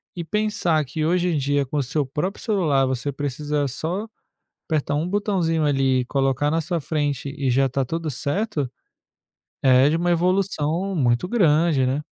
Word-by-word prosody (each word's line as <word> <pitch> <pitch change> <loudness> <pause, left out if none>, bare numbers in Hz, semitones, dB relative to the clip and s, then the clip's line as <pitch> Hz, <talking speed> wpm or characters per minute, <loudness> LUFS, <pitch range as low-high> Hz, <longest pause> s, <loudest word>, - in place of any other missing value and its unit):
E 170 - -4
pensar 175 -4 0
que 155 +4 -4
hoje 180 +2 +2
em 160 - 0
dia, 140 0 +1
com 145 +2 -1
seu 145 +2 -1
próprio 155 +9 -3
celular, 160 - +2
você 130 +2 -2
precisa 145 +1 -2
só 175 - -3 0.6
apertar 150 -2 -1
um 155 +3 -1
botãozinho 180 -6 0
ali, 135 -2 +2
e 125 - -5
colocar 135 +1 +1
na 165 +1 +1
sua 170 +2 -2
frente 145 -3 -2
e 135 -2 0
já 135 +2 +3
está 135 +1 0
tudo 160 +4 -3
certo, 145 - -2 0.9
é 130 0 +5
de 160 - +1
uma 175 +1 0
evolução 180 0 0
muito 120 +1 +2
grande, 160 - +3
né. 135 +3 0
150 Hz, 170 wpm, -23 LUFS, 135-170 Hz, 0.9 s, é